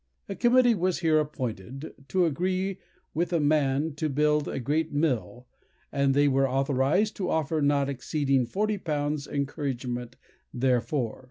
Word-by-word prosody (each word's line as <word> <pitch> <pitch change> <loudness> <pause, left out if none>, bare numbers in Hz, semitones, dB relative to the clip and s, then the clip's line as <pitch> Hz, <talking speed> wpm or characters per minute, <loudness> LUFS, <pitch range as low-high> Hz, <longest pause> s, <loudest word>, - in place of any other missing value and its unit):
A - - -4
committee 245 +2 +4
was 185 -3 0
here 160 -2 +4
appointed, 135 - -5
"to 185 +2 +2
agree 185 +4 -1 0.3
with 170 +3 -1
a 170 - +2
man 145 0 +1
to 155 +1 -1
build 150 +1 +2
a - - -3
great 155 +5 -1
mill, 130 -5 -1 0.5
and 140 -1 +2
they 145 0 +4
were 135 -1 +2
authorized 135 - +1
to 185 -3 -2
offer 160 0 0
not 140 -1 +2
exceeding 135 0 0
forty 210 - -1
pounds 150 -3 -2
encouragement 130 -4 -3 0.4
therefor." 125 0 0
145 Hz, 145 wpm, -27 LUFS, 135-165 Hz, 0.5 s, committee